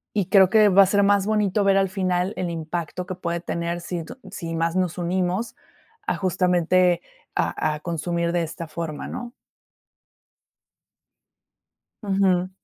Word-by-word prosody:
Y 200 Hz, -4 st, +1 dB
creo 190 Hz, -1 st, +6 dB
que 215 Hz, 0 st, +5 dB
va 195 Hz, +1 st, +7 dB
a -, -, +3 dB
ser 200 Hz, +2 st, +2 dB
más 200 Hz, -1 st, +3 dB
bonito 210 Hz, -1 st, +1 dB
ver 195 Hz, 0 st, +4 dB
al 195 Hz, -1 st, +2 dB
final 185 Hz, 0 st, -1 dB
el 180 Hz, -2 st, -2 dB
impacto 170 Hz, +2 st, -4 dB
que 185 Hz, -, -5 dB
puede 170 Hz, -1 st, -3 dB
tener 170 Hz, 0 st, -3 dB
si 170 Hz, -1 st, -4 dB
tu 160 Hz, -, -11 dB
si 165 Hz, -4 st, -5 dB
más 165 Hz, +1 st, 0 dB
nos 180 Hz, -2 st, 0 dB
unimos, 180 Hz, +5 st, -1 dB, 0.5 s
a -, -, +1 dB
justamente, 180 Hz, -1 st, +2 dB, 0.3 s
a 155 Hz, -1 st, 0 dB
a -, -, -8 dB
consumir 170 Hz, 0 st, -2 dB
de 175 Hz, -1 st, 0 dB
esta 165 Hz, +1 st, -6 dB
forma, 155 Hz, -1 st, -5 dB
¿no? 245 Hz, 0 st, -7 dB, 2.7 s
Ujú. 190 Hz, -3 st, +1 dB
180 Hz, 150 wpm, -23 LUFS, 170-195 Hz, 2.7 s, va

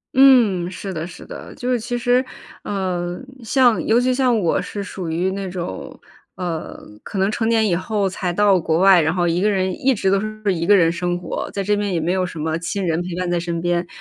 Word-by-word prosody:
嗯， 235 Hz, -10 st, +5 dB
是 190 Hz, +1 st, -6 dB
的 160 Hz, +1 st, -4 dB
是 170 Hz, -, -11 dB
的。 -, -, -9 dB
就 250 Hz, +1 st, -3 dB
是 245 Hz, -, +1 dB
其 245 Hz, +2 st, -3 dB
实， 245 Hz, +1 st, +2 dB, 0.4 s
呃， 180 Hz, -3 st, -3 dB, 0.2 s
像 245 Hz, 0 st, +3 dB
尤 230 Hz, +2 st, +4 dB
其 255 Hz, +1 st, +1 dB
像 250 Hz, -3 st, +2 dB
我 170 Hz, -5 st, +1 dB
是 200 Hz, -1 st, -5 dB
属 185 Hz, -4 st, -6 dB
于 175 Hz, +4 st, 0 dB
那 195 Hz, 0 st, -4 dB
种， 175 Hz, -, -6 dB, 0.4 s
呃， 170 Hz, -3 st, -5 dB, 0.2 s
可 -, -, -7 dB
能 195 Hz, +2 st, +2 dB
成 225 Hz, +1 st, -1 dB
年 225 Hz, -1 st, +3 dB
以 180 Hz, -, +2 dB
后 195 Hz, +2 st, -1 dB
才 185 Hz, -1 st, -3 dB
到 195 Hz, 0 st, +3 dB
国 160 Hz, 0 st, 0 dB
外， 190 Hz, -2 st, +6 dB
然 155 Hz, -, +1 dB
后 175 Hz, -1 st, +1 dB
一 170 Hz, +2 st, 0 dB
个 210 Hz, -, +3 dB
人 190 Hz, -2 st, 0 dB
一 265 Hz, +4 st, +1 dB
直 195 Hz, -1 st, 0 dB
都 195 Hz, -, +3 dB
是 215 Hz, -2 st, -2 dB
1 170 Hz, 0 st, -2 dB
个 205 Hz, -, +7 dB
人 165 Hz, -2 st, +4 dB
生 175 Hz, +1 st, -2 dB
活， 180 Hz, -, -5 dB
在 200 Hz, -, -3 dB
这 210 Hz, +2 st, +1 dB
边 205 Hz, -1 st, -1 dB
也 175 Hz, -, 0 dB
没 165 Hz, +2 st, -1 dB
有 185 Hz, 0 st, +1 dB
什 165 Hz, -, -9 dB
么 160 Hz, +1 st, -1 dB
亲 190 Hz, +3 st, -3 dB
人 165 Hz, 0 st, 0 dB
陪 175 Hz, -1 st, -5 dB
伴 180 Hz, 0 st, -2 dB
在 175 Hz, -, +1 dB
身 170 Hz, -1 st, -3 dB
边。 175 Hz, 0 st, -1 dB
190 Hz, 255 characters per minute, -20 LUFS, 175-215 Hz, 0.4 s, 个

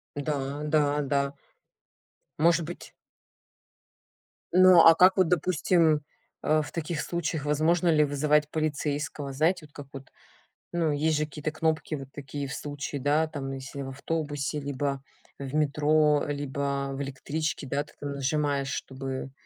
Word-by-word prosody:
Да, 145 Hz, -1 st, -3 dB
да, 150 Hz, -1 st, +2 dB
да. 140 Hz, 0 st, 0 dB, 1.1 s
Может 170 Hz, +1 st, +3 dB
быть 175 Hz, +2 st, -9 dB, 1.6 s
Ну 185 Hz, -1 st, +8 dB
а 165 Hz, 0 st, +9 dB
как 185 Hz, +3 st, +6 dB
вот 185 Hz, -2 st, +4 dB
допустим, 165 Hz, -2 st, +2 dB, 0.4 s
а, 155 Hz, 0 st, +2 dB
в 150 Hz, -, -7 dB
таких 165 Hz, -1 st, -3 dB
случаях, 160 Hz, -3 st, -3 dB
возможно 160 Hz, +4 st, +2 dB
ли 155 Hz, -2 st, +5 dB
вызывать 150 Hz, +1 st, +2 dB
полицейского? 145 Hz, -2 st, -2 dB
Знаете 160 Hz, +4 st, +1 dB
вот 150 Hz, -, -20 dB
как 145 Hz, -2 st, -9 dB
вот, 135 Hz, -1 st, -9 dB, 0.6 s
ну 165 Hz, -3 st, +1 dB
есть 155 Hz, +1 st, +1 dB
же 155 Hz, -, 0 dB
какие-то 150 Hz, +1 st, -5 dB
кнопки 160 Hz, 0 st, -1 dB
вот 135 Hz, -2 st, -8 dB
такие 140 Hz, 0 st, -5 dB
в 140 Hz, -, -6 dB
случае, 145 Hz, -1 st, -5 dB
да, 150 Hz, +3 st, +2 dB
там 140 Hz, -3 st, -5 dB
если 135 Hz, +1 st, -7 dB
в 135 Hz, -, -5 dB
автобусе, 145 Hz, +1 st, -3 dB
либо 140 Hz, -1 st, -2 dB, 0.4 s
в 135 Hz, -1 st, -6 dB
метро, 150 Hz, 0 st, +3 dB
либо 140 Hz, -1 st, -2 dB
в 135 Hz, -, -4 dB
электричке, 140 Hz, +2 st, -3 dB
да, 140 Hz, +2 st, -1 dB
ты 150 Hz, -, -20 dB
там 145 Hz, -1 st, -4 dB
нажимаешь 140 Hz, 0 st, 0 dB
чтобы, 135 Hz, 0 st, -5 dB
145 Hz, 145 wpm, -27 LUFS, 140-155 Hz, 1.6 s, а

